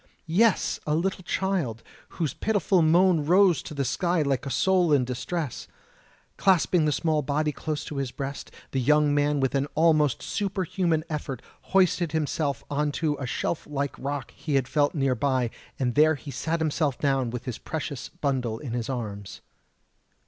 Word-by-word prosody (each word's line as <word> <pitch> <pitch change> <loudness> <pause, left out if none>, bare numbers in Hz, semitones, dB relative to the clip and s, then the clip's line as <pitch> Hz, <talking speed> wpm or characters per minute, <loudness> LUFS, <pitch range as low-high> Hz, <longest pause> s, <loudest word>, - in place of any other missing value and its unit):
Yes, 195 +6 +2
a 150 - +2
little 185 +3 -1
child, 170 - -1 0.3
whose 160 -7 -1
pitiful 205 -4 +1
moan 170 0 +4
rose 180 0 +4
to 150 - -9
the 140 -1 -1
sky 170 +5 +1
like 140 -1 -1
a - - -2
soul 180 +2 +2
in 140 -4 +4
distress. 130 +4 -4 0.7
Clasping 180 -3 +3
the 150 - +2
small 155 +1 +1
body 150 +2 0
close 150 0 -4
to 150 - -6
his 135 -2 -1
breast, 135 +2 -6 0.2
the 135 - 0
young 150 +2 +3
man 145 0 +2
with 135 -1 +1
an 140 0 +1
almost 155 -4 +3
superhuman 185 -5 -1
effort 145 -5 -4 0.3
hoisted 180 -4 +2
himself 150 -3 -1
on 145 0 0
to 155 -2 0
a 130 - -3
shelf 155 - -2
like 140 -1 -2
rock 140 -1 -4
he 150 -3 -2
had 135 -2 +2
felt 145 +2 +1
near 135 -3 +2
by, 130 -1 0 0.3
and 125 -2 0
there 155 +3 +5
he 140 +1 -9
sat 165 +4 -2
himself 150 -3 0
down 135 -4 +1
with 120 0 -6
his 125 -4 -5
precious 145 -4 -5
bundle 130 -9 -2
in 120 -1 -6
his 120 0 -3
arms. 105 -6 -5
150 Hz, 170 wpm, -26 LUFS, 135-165 Hz, 0.7 s, there